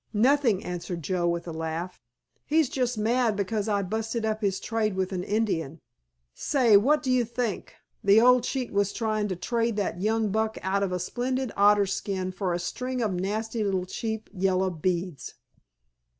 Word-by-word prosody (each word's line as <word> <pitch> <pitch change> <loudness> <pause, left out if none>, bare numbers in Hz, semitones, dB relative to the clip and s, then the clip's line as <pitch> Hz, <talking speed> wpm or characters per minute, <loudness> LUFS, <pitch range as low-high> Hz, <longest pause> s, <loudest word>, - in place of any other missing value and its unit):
"Nothing," 245 -3 +3
answered 175 -1 -5
Joe 180 +1 0
with 170 0 -1
a - - -4
laugh, 160 +3 -4 0.5
"he's 310 -3 +3
just 250 -3 -1
mad 230 +1 +2
because 205 +1 -1
I 200 -1 +1
busted 220 +3 -2
up 215 0 -1
his 195 -2 0
trade 215 -3 -1
with 190 +1 -1
an 180 -2 -2
Indian. 175 -8 -1 0.5
Say, 245 - +3
what 290 +9 +4
do 260 - 0
you 250 -1 +3
think, 235 -3 -3 0.3
the 200 +2 +6
old 250 +1 +5
cheat 255 -3 -3
was 200 0 +1
tryin' 215 -2 -1
to 185 - -3
trade 230 +5 -1
that 190 -4 -2
young 220 +1 +1
buck 220 +1 0
out 195 +1 0
of 195 -2 0
a 180 - 0
splendid 250 +6 -2
otter 205 0 +5
skin 190 -1 -3
for 185 -1 -2
a 175 - 0
string 250 +9 -3
of 210 -4 0
nasty 215 +5 -2
little 190 -3 0
cheap 220 +3 -4
yellow 190 -1 +1
beads!" 175 -3 -3
205 Hz, 180 wpm, -27 LUFS, 185-230 Hz, 0.5 s, the